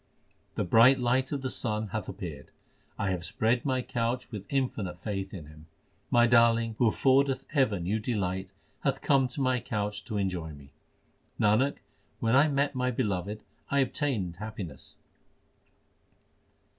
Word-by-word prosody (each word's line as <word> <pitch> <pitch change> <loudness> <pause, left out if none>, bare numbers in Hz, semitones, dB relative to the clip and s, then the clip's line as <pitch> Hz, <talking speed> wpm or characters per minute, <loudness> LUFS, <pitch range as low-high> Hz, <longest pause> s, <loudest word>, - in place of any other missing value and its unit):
The - - 0
bright 115 +8 +6
light 130 +2 +1
of 140 -2 -3
the 130 - -2
sun 110 -3 -2
l - - -5
hath 110 +2 -4
appeared. 90 -7 -7 0.5
I 100 - 0
have 90 -2 -2
spread 110 +8 0
my 130 -2 0
couch 120 +2 -2
with 105 -4 -7
infinite 115 -10 -1
faith 95 0 -4
in 85 -6 -8
Him. 75 +1 -15 0.4
My 120 0 +5
Darling 115 -1 +4
who 120 - +4
affordeth 135 +3 +2
ever 130 - +2
new 95 +6 -1
delight 95 -5 -2 0.3
hath - - -1
come 135 -2 +4
to 140 +3 -5
my 130 -1 +2
couch 105 -2 -3
to 110 - -3
enjoy 90 -5 -2
me. 70 -1 -14 0.7
Nanak, 110 +7 +3 0.4
when 115 +1 +2
I 140 +3 +6
met 140 0 +1
my 125 -1 0
Beloved 105 -4 -2 0.3
I 140 0 +3
obtained 125 - -1
happiness. 100 -9 -7
110 Hz, 155 wpm, -29 LUFS, 95-130 Hz, 0.7 s, bright